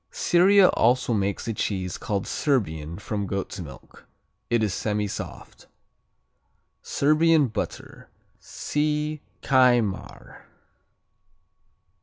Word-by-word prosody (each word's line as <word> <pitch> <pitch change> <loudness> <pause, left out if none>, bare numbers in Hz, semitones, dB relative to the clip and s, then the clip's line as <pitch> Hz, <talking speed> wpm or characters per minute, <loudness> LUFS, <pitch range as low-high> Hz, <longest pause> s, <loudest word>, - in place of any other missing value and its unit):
Syria 195 - +4
also 120 +1 +2
makes 100 +1 -2
a 115 - -1
cheese 95 -4 -3
called 100 -2 -2
Serbian 85 - -1
from 100 -1 -4
goat's 100 +1 -4
milk. 70 -8 -12 0.4
It 120 -2 +2
is 105 -4 0
semisoft. 105 0 -5 1.1
Serbian 155 +1 +3
Butter 110 - -6 0.3
see 150 0 -2 0.2
Kajmar. 120 -6 +1
115 Hz, 85 wpm, -25 LUFS, 100-150 Hz, 1.1 s, Syria